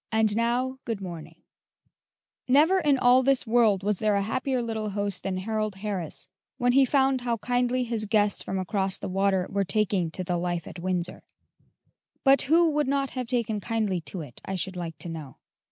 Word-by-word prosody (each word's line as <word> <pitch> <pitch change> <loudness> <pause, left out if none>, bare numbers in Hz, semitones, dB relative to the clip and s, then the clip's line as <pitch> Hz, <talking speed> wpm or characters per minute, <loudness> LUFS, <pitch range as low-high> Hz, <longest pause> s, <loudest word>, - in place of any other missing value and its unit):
"AND 220 -2 +2
NOW 245 +3 0
GOOD 225 -4 -3
MORNING," 175 -5 -9 1.0
[Illustration: 250 - +1
9066] 340 +6 +5
Never 300 - 0
in 275 - +5
all 250 0 +5
this 270 0 +3
world 220 -4 +3
was 205 -1 0
there 215 -1 +2
a 200 - +1
happier 255 +4 -1
little 220 -2 -3
host 200 -2 -2
than 190 -1 -3
Harold 215 +1 -2
Harris 190 -5 -4 0.3
when 245 -1 +2
he 270 +2 +5
found 265 -1 +2
how 240 -1 -1
kindly 245 +2 0
his 230 -3 -2
guests 205 -1 +2
from 190 - -4
across 190 0 0
the - - -6
water 190 0 +1
were 200 0 +1
taking 195 -3 0
to 185 +3 -2
the 180 -1 -1
life 175 -1 -2
at - - -9
Windsor; 180 0 -2 1.0
but 275 0 +5
who 330 +1 +5
would 295 -1 0
not 275 0 0
have 255 -2 -4
taken 230 -4 -1
kindly 205 -4 -1
to 175 +2 -7
it, 135 -6 -11
I 195 - -4
should 185 +1 -3
like 165 -3 -5
to 170 - -4
know? 155 -5 -8
215 Hz, 200 wpm, -26 LUFS, 190-250 Hz, 1.0 s, 9066